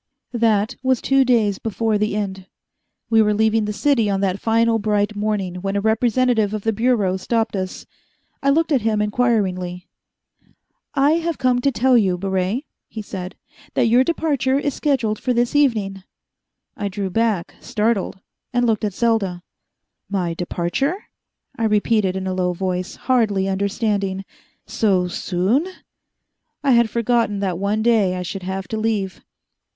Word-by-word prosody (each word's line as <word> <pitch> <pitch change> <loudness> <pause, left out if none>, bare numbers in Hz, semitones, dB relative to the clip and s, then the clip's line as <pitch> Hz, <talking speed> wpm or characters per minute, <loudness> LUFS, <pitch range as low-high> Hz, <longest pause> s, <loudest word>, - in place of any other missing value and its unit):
That 220 -3 +1
was 260 -2 +2
two 270 0 +3
days 220 -6 +2
before 220 0 -1
the 210 0 0
end. 190 -2 -4 0.6
We 225 -1 +6
were 210 -1 +2
leaving 220 0 +2
the 210 - -2
city 230 -1 +2
on 195 -1 0
that 195 0 0
final 225 0 +2
bright 210 0 0
morning, 205 -4 -2
when 195 +2 -3
a - - +2
representative 220 0 +2
of 210 - -5
the 225 - +1
Bureau 215 -4 +1
stopped 225 +3 -1
us. 185 -1 -4 0.6
I 275 - +2
looked 325 +3 +2
at 270 -4 +3
him 215 -1 +1
inquiringly. 200 -5 0 1.1
"I 280 +1 +4
have 335 -2 -2
come 250 -2 +2
to 275 - +2
tell 255 +1 +4
you, 185 -4 +1
Baret," 190 +6 -1 0.2
he 220 - -7
said, 185 -2 -7 0.4
"that - - +3
your 245 +3 +5
departure 280 -4 0
is 285 -1 -1
scheduled 240 -8 0
for 250 - 0
this 240 +3 0
evening." 215 -9 +1 0.7
I 205 - -3
drew 195 -1 -4
back, 220 -4 0
startled, 210 -3 -1 0.3
and 245 0 +1
looked 220 -3 +1
at 205 -3 -2
Selda. 200 -7 0 0.7
"My 180 -4 -1
departure?" 175 - -1 0.6
I 225 - +1
repeated 210 -2 +2
in 190 0 -3
a 185 - -1
low 180 -1 0
voice, 180 0 -3
hardly 215 -7 +1
understanding. 195 0 -1 0.4
"So 190 -5 +1
soon?" 195 - 0 1.0
I 280 - +3
had 235 -2 +4
forgotten 235 -2 +1
that 185 -3 -1
one 205 +2 0
day 215 -6 +3
I 180 - -3
should 190 +2 -5
have 190 +1 -4
to 220 - -2
leave. 215 -4 -2
215 Hz, 155 wpm, -21 LUFS, 195-235 Hz, 1.1 s, We